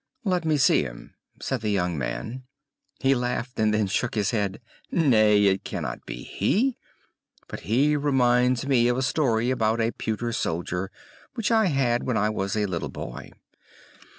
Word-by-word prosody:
"Let 180 Hz, -5 st, 0 dB
me 155 Hz, -1 st, +2 dB
see 130 Hz, -, +4 dB
him," 65 Hz, -4 st, -8 dB, 0.3 s
said 130 Hz, -3 st, -3 dB
the 110 Hz, -, -1 dB
young 90 Hz, -4 st, 0 dB
man. 110 Hz, -, -4 dB, 0.6 s
He 135 Hz, 0 st, +4 dB
laughed, 125 Hz, 0 st, -3 dB
and 110 Hz, -1 st, +3 dB
then 105 Hz, 0 st, +2 dB
shook 110 Hz, +5 st, -1 dB
his 105 Hz, -3 st, +1 dB
head. 100 Hz, -3 st, -1 dB, 0.3 s
"Nay, 110 Hz, -10 st, +4 dB
it 95 Hz, -1 st, +2 dB
cannot -, -, -5 dB
be -, -, -6 dB
he; 250 Hz, +5 st, 0 dB, 0.7 s
but -, -, -7 dB
he 135 Hz, -, +2 dB
reminds 125 Hz, -3 st, +2 dB
me 125 Hz, -4 st, +3 dB
of 125 Hz, 0 st, +1 dB
a 130 Hz, -, 0 dB
story 125 Hz, -4 st, +1 dB
about 110 Hz, -2 st, +1 dB
a 115 Hz, 0 st, +1 dB
pewter 115 Hz, +1 st, -3 dB
soldier 90 Hz, -1 st, -2 dB, 0.5 s
which 230 Hz, -2 st, -1 dB
I 220 Hz, -3 st, +4 dB
had 130 Hz, -6 st, +1 dB
when 125 Hz, -3 st, -1 dB
I 105 Hz, +1 st, +1 dB
was 100 Hz, -1 st, -2 dB
a 105 Hz, -, +1 dB
little 90 Hz, -4 st, -3 dB
boy!" -, -, -7 dB
120 Hz, 170 wpm, -25 LUFS, 105-135 Hz, 0.7 s, see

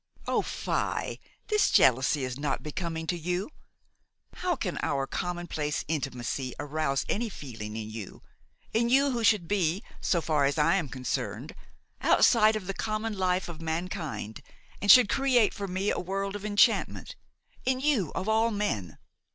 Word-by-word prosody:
"Oh! -, -, +2 dB
fie! -, -, -2 dB, 0.3 s
this 425 Hz, -1 st, +3 dB
jealousy 135 Hz, +3 st, +4 dB
is 130 Hz, +1 st, -4 dB
not 145 Hz, -2 st, -2 dB
becoming 160 Hz, +1 st, -4 dB
to 175 Hz, -, -1 dB
you! 180 Hz, -, -3 dB, 0.9 s
How 360 Hz, -1 st, 0 dB
can 185 Hz, -, -3 dB
our 135 Hz, -1 st, 0 dB
commonplace 175 Hz, -2 st, -3 dB
intimacy 130 Hz, -4 st, -3 dB
arouse 145 Hz, -2 st, -1 dB
any 230 Hz, +2 st, -1 dB
feeling 115 Hz, -, -7 dB
in 110 Hz, -1 st, -5 dB
you, 110 Hz, -3 st, -8 dB, 0.5 s
in 235 Hz, +2 st, +2 dB
you 275 Hz, +2 st, +4 dB
who 235 Hz, -2 st, -2 dB
should 205 Hz, -6 st, +3 dB
be, 190 Hz, 0 st, 0 dB, 0.2 s
so 175 Hz, -, +2 dB
far 155 Hz, -3 st, +1 dB
as 140 Hz, +3 st, 0 dB
I 160 Hz, +2 st, +4 dB
am 165 Hz, -8 st, -2 dB
concerned, 130 Hz, -1 st, -4 dB, 0.5 s
outside 220 Hz, -2 st, +5 dB
of 215 Hz, -3 st, -4 dB
the 195 Hz, -, -3 dB
common 215 Hz, +2 st, -2 dB
life 185 Hz, -1 st, 0 dB
of 165 Hz, -2 st, -8 dB
mankind 160 Hz, -, -4 dB, 0.4 s
and 205 Hz, -, -2 dB
should 245 Hz, +2 st, +9 dB
create 250 Hz, -4 st, +3 dB
for 200 Hz, -, -5 dB
me 190 Hz, +2 st, -1 dB
a -, -, -1 dB
world 195 Hz, +2 st, -3 dB
of 205 Hz, 0 st, -6 dB
enchantment–in 215 Hz, +4 st, 0 dB
you 265 Hz, -, +1 dB
of 190 Hz, -, -3 dB
all 220 Hz, +1 st, +3 dB
men! 200 Hz, -, -2 dB
180 Hz, 155 wpm, -28 LUFS, 145-215 Hz, 0.9 s, should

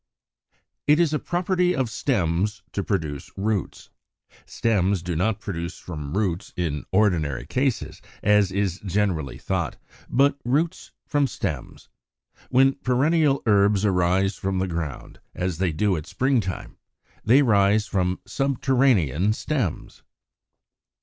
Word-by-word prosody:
It 150 Hz, +2 st, +5 dB
is 165 Hz, -3 st, +2 dB
a 150 Hz, -, +1 dB
property 180 Hz, 0 st, 0 dB
of 130 Hz, -4 st, 0 dB
stems 100 Hz, -, 0 dB
to 100 Hz, -, -2 dB
produce 75 Hz, -9 st, -3 dB
roots. 100 Hz, -1 st, -2 dB, 0.6 s
Stems 100 Hz, -5 st, +1 dB
do 90 Hz, -1 st, -3 dB
not 100 Hz, +5 st, 0 dB
spring 85 Hz, -3 st, -4 dB
from 80 Hz, -2 st, -6 dB
roots 95 Hz, -2 st, -2 dB
in 75 Hz, -6 st, -2 dB
ordinary 85 Hz, -, +1 dB
cases, 130 Hz, -, -1 dB, 0.2 s
as 105 Hz, -2 st, +4 dB
is 95 Hz, -2 st, -1 dB
generally 95 Hz, -8 st, -1 dB
thought, -, -, -2 dB, 0.3 s
but 140 Hz, +2 st, +3 dB
roots 155 Hz, +9 st, -1 dB, 0.2 s
from 145 Hz, -2 st, +1 dB
stems. 90 Hz, -, -5 dB, 0.6 s
When 135 Hz, +1 st, +4 dB
perennial 140 Hz, +3 st, +2 dB
herbs 100 Hz, -1 st, +3 dB
arise 95 Hz, +1 st, +2 dB
from 95 Hz, -1 st, -2 dB
the 95 Hz, +1 st, 0 dB
ground, 80 Hz, -6 st, -5 dB, 0.2 s
as 90 Hz, -2 st, -2 dB
they 95 Hz, -3 st, +1 dB
do 100 Hz, +5 st, +1 dB
at 75 Hz, -2 st, -5 dB
spring 130 Hz, 0 st, +1 dB
time, 95 Hz, -3 st, -6 dB, 0.5 s
they 130 Hz, +6 st, +5 dB
rise 105 Hz, -2 st, +3 dB
from 90 Hz, -1 st, -1 dB
subterranean 125 Hz, -, +2 dB
stems. 125 Hz, -, -3 dB
100 Hz, 125 wpm, -24 LUFS, 90-130 Hz, 0.6 s, It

